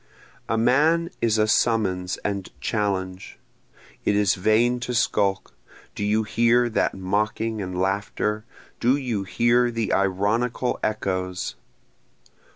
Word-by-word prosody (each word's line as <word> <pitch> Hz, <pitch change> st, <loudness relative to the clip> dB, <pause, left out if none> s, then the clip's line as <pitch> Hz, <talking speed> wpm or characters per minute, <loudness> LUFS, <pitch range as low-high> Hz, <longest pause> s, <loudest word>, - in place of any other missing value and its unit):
A 115 Hz, -, +1 dB
man 155 Hz, +9 st, +3 dB
is 110 Hz, -2 st, +2 dB
a 110 Hz, 0 st, +3 dB
summons 100 Hz, -6 st, +1 dB
and 100 Hz, -2 st, -2 dB
challenge, 95 Hz, -4 st, -2 dB, 0.7 s
(It 105 Hz, -, +1 dB
is 100 Hz, -3 st, +3 dB
vain 115 Hz, +6 st, +2 dB
to 120 Hz, +1 st, -3 dB
skulk 100 Hz, -3 st, 0 dB, 0.4 s
do -, -, -4 dB
you 105 Hz, +2 st, +2 dB
hear 120 Hz, +3 st, +2 dB
that 110 Hz, -, 0 dB
mocking 105 Hz, +3 st, -1 dB
and 90 Hz, -1 st, -4 dB
laughter? 105 Hz, +2 st, -1 dB, 0.4 s
do 125 Hz, +3 st, +3 dB
you 120 Hz, -8 st, -2 dB
hear 120 Hz, +4 st, +2 dB
the 115 Hz, -2 st, -2 dB
ironical 105 Hz, +6 st, 0 dB
echoes?) 95 Hz, -4 st, -2 dB
110 Hz, 120 wpm, -24 LUFS, 95-120 Hz, 0.7 s, man